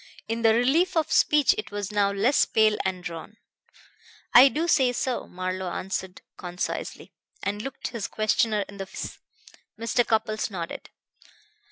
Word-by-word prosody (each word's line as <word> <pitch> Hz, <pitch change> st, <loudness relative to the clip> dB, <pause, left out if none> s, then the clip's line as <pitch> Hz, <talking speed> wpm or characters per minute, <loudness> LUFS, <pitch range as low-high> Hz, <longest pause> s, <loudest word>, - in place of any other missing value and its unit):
In 225 Hz, +1 st, -2 dB
the 225 Hz, -1 st, +5 dB
relief 320 Hz, +10 st, +2 dB
of 320 Hz, -, +1 dB
speech 300 Hz, +2 st, +4 dB
it -, -, -5 dB
was 205 Hz, 0 st, -4 dB
now 205 Hz, -1 st, +2 dB
less 215 Hz, +8 st, +3 dB
pale 215 Hz, -1 st, +3 dB
and 185 Hz, -1 st, -3 dB
drawn. 170 Hz, +4 st, -8 dB, 1.0 s
"I 260 Hz, +3 st, +9 dB
do 320 Hz, +5 st, -2 dB
say 265 Hz, -7 st, +3 dB
so," 250 Hz, 0 st, -2 dB
Marlowe 185 Hz, 0 st, -4 dB
answered 190 Hz, 0 st, -5 dB
concisely, 180 Hz, 0 st, -5 dB, 0.3 s
and 205 Hz, +1 st, -2 dB
looked 270 Hz, +4 st, -5 dB
his 230 Hz, -4 st, -4 dB
questioner 215 Hz, -1 st, +1 dB
in 200 Hz, -, -12 dB
the 195 Hz, -1 st, -6 dB
face. -, -, -7 dB, 0.6 s
Mr. 230 Hz, +1 st, +1 dB
Cupples 220 Hz, -1 st, 0 dB
nodded. 175 Hz, -4 st, -6 dB
215 Hz, 150 wpm, -26 LUFS, 190-245 Hz, 1.0 s, I